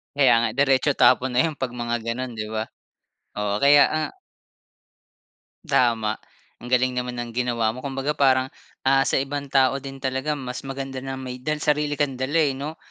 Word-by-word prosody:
Kaya 135 -4 +5
nga 115 - +1
diretso 135 +1 +3
tapon 130 -1 +4
na 125 - +1
yun 160 -3 -1
'pag 130 -4 -3
mga 120 -1 -2
ganon, 120 +1 -4
'di 110 -1 -4
ba? 110 0 -3 0.7
Oo 105 0 -1
kaya, 145 +1 +7
ah 155 0 -1 1.5
Tama. 110 -3 +1 0.4
Ang 120 - -8
galing 125 0 +2
naman 125 -1 -3
ng 120 -1 -5
ginawa 120 -2 0
mo. 130 - -9
Kumbaga 135 +2 -2
parang, 130 -2 +4 0.4
ah, 135 0 +4
sa - - +1
ibang 140 +1 -3
tao 135 0 +3
din 135 0 -8
talaga 130 +3 -1
mas 125 -1 -6
maganda 135 0 -5
na 135 0 -5
may 125 -1 -7
dal 155 +3 -1
may - - -12
sarili 150 0 +1
kang 145 -2 0
dala 135 +5 -1
eh 150 -4 +3
'no. 150 +3 -6
130 Hz, 185 wpm, -23 LUFS, 125-140 Hz, 1.5 s, kaya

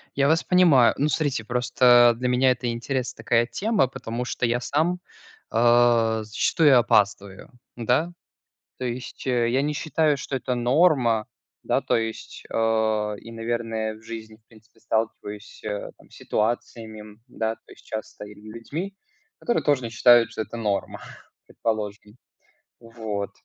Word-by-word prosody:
Я 140 0 +2
вас 160 +2 +2
понимаю. 170 -10 +5
Ну, 145 - +1
смотрите, 140 -5 -1
просто 120 0 +4
для 125 +1 -2
меня 125 +1 +3
это 125 -1 -2
интересная 125 +2 -3
такая 120 0 +2
тема, 205 - 0
потому 120 -1 -5
что 120 - -2
я 120 +1 +1
сам, 160 +7 0 0.5
а, 115 -1 +3
зачастую 130 +6 +3
опаздываю. 100 +3 0 0.2
Да? 125 +8 0 0.7
То 130 - -5
есть 125 +2 -6
я 125 +1 +1
не 150 - -1
считаю, 155 -1 +1
что 140 - -4
это 125 -1 -2
норма. 125 -3 +2 0.4
Да, - - +2
то - - 0
есть, 115 -1 -5
э, 110 -2 0
и, 115 - -11
наверное, 115 -1 -3
в 110 - -16
жизни, 110 -1 -9
в 110 0 -37
принципе, 110 0 -22
сталкиваюсь 110 -2 -4 0.3
там - - -22
с - - -17
ситуациями, 110 -1 -4
да, 110 -2 -3
то - - -19
есть - - -19
часто 110 -1 -7
или 105 0 -13 0.2
людьми, 165 +12 -6 0.5
которые 240 - 0
тоже 145 -4 +2
не - - -3
считают, 120 +1 +5
что - - -3
это 115 - -8
норма, 100 -4 -2 0.5
предположим. 105 0 -4 0.6
Вот. 110 -3 -5
120 Hz, 145 wpm, -24 LUFS, 110-130 Hz, 0.7 s, понимаю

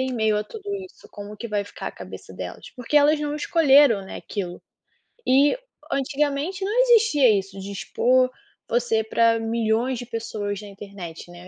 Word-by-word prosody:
em 260 0 -1
meio 220 -3 +1
a 210 - -3
tudo 430 - -10 0.2
isso, 370 - -16
como 205 +1 -9
que 235 +2 -6
vai 205 -1 -1
ficar - - -9
a - - -11
cabeça - - -10
delas, - - -8
porque 250 +4 -2
elas 295 +1 +5
não 295 0 -2
escolheram, 285 - +4
né, - - -8
aquilo. 180 -4 -6 0.7
E 280 - +4 0.3
antigamente 290 +7 -1
não 425 +5 0
existia 450 - +5
isso, 195 0 -6
de 195 +1 -7
expor 255 +5 +2 0.4
você 230 -2 +1
para 230 +1 +2
milhões 225 +2 0
de 245 - -6
pessoas 215 -3 -4
na 210 - -10
internet, 195 -4 -9
né, 175 +1 -12
235 Hz, 175 wpm, -24 LUFS, 205-290 Hz, 0.7 s, elas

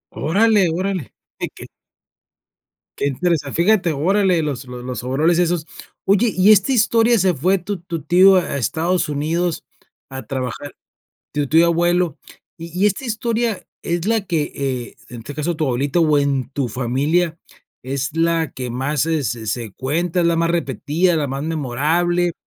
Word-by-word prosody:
Órale, 200 +2 +3
órale. 185 -3 -3 0.3
¿De - - -3
qué? - - -10 1.3
Que 140 - 0
interesa 145 0 -1
fíjate, 180 -1 +2
órale 180 +3 +2
los 135 -4 -3
los 125 -1 -8
los 125 -2 -5
overoles 155 +7 +1
esos. 170 -2 +1 0.4
Oye, 205 +3 +3
¿y 190 +3 +6
esta 210 +5 +4
historia, 230 0 +3
se 185 -1 +2
fue 180 +7 +1
tu 190 +2 -4
tu 165 -4 -5
tío 185 +4 +6
a 175 -6 0
Estados 160 - 0
Unidos 160 +4 -1 0.5
a 135 0 -7
trabajar? 130 +1 -5 0.6
Tu 145 -1 -1
tío 165 +4 +4
abuelo. 175 0 +1 0.4
Y 165 +1 -9
y 210 - +6
esta 210 +6 -1
historia 230 -2 -1 0.2
es 170 +2 -2
la 225 -1 +2
que, 160 -5 -1
eh, 130 -3 -4
en 120 - -8
este 135 +5 -8
caso, 155 +3 -2
tu 155 0 -1
abuelita 135 +6 0
o 155 -3 +3
en 140 -3 0
tu 135 -3 -2
familia, 145 +8 0 0.4
¿es 135 +3 -3
la 165 -1 +1
que 125 -2 -6
más 135 +4 -1
se 160 -2 0
se 115 -2 -4
se 115 -1 -3
cuenta, 165 - -1
es 170 - +2
la 170 - +2
más 165 0 +1
repetida, 170 - 0
la 145 -3 -1
más 135 +2 -4
memorable? 165 +4 0
165 Hz, 165 wpm, -20 LUFS, 140-180 Hz, 1.3 s, y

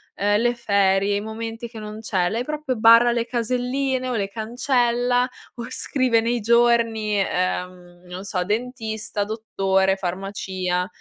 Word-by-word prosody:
ehm, 205 +1 +2
le 240 0 +2
ferie, 200 -3 +2
i 205 - -1
momenti 225 +2 -6
che 225 -1 -10
non 215 +1 -8
c'è, 185 -5 0
lei 235 +2 -2
proprio 300 -2 -3
barra 230 +2 +7
le 235 -1 0
caselline 255 +2 -1
o 245 - -1
le 200 -2 -1
cancella 245 +2 +1 0.3
o 235 -1 -6
scrive 255 -4 +1
nei 235 +1 0
giorni, 230 -2 +2
ehm, 180 -1 -3
non 180 +2 -8
so, 185 -2 -1
dentista, 220 -2 -3
dottore, 195 -3 0
farmacia; 185 -1 -3
220 Hz, 140 wpm, -23 LUFS, 195-240 Hz, 0.3 s, barra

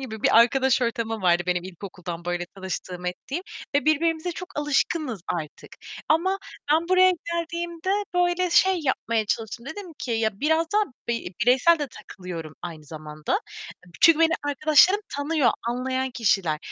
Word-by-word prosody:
gibi 220 -5 -7
bir - - +5
arkadaş 260 +2 +3
ortamım 225 -2 -2
vardı 175 -1 +3
benim 180 -1 0
ilkokuldan 180 -2 -8
böyle 175 0 -2
tanıştığım 185 -2 -6
ettiğim 270 - -4 0.3
ve 285 - +2
birbirimize 320 +2 +1
çok 365 0 -8
alışkınız 295 - 0
artık 155 -3 -7 0.3
ama 370 +5 +2 0.3
ben 325 +2 +2
buraya 370 0 +6
geldiğimde 340 0 -3 0.2
böyle 355 0 +2
şey 375 +1 +4
yapmaya 230 -5 0
çalıştım. 225 +3 -3
Dedim 380 +2 -7
ki 250 - -5
ya, 220 -3 0
biraz 320 +2 +2
da 420 - +4 0.3
bi 230 -6 -2
bireysel 260 +8 +5
de 290 - -2
takılıyorum 175 -8 -8
aynı 165 -3 -7
zamanda. 155 - -4 0.6
Çünkü 330 -1 +7
beni 330 0 +4
arkadaşlarım 310 +7 +4 0.2
tanıyor, 285 -3 +2 0.2
anlayan 260 +2 -1
kişiler 195 -10 +1
260 Hz, 145 wpm, -25 LUFS, -, 0.6 s, Çünkü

